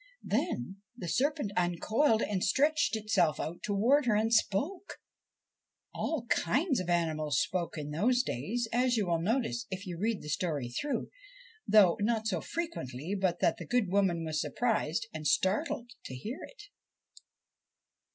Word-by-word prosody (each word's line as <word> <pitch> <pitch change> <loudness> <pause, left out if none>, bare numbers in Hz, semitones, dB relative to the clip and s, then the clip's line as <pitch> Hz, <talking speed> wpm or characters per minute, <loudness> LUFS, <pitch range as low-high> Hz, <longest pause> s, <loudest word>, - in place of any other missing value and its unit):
Then 125 +11 -2 0.2
the 180 - -6
serpent 280 - 0
uncoiled 215 - +2
and 195 -3 -1
stretched 295 +5 +2
itself 210 -8 +1
out 170 +2 -4
towards 240 +7 +2
her 215 - +4
and 220 +2 +1
spoke. 280 - 0 1.0
All 305 -8 -2
kinds 265 - +1
of 180 -1 -4
animals 155 -5 +1
spoke 175 -3 -2
in 150 -1 -5
those 245 +11 +2
days, 225 - -2
as 245 0 +2
you 210 - +1
will 170 -2 0
notice 235 +4 -1
if 190 +1 -5
you 175 -3 -6
read 220 +1 -1
the - - -8
story 150 -6 -1
through, 285 - -3 0.6
though 200 -5 +6
not 220 +1 0
so 185 -7 0
frequently 175 - -4
but 190 -3 0
that - - +3
the - - -8
good 245 -6 +1
woman 185 -4 +2
was 155 -1 -1
surprised 230 -5 0
and 155 -1 -3
startled 235 - 0
to 130 - -6
hear 215 - -6
it. - - -14
205 Hz, 150 wpm, -31 LUFS, 170-240 Hz, 1.0 s, though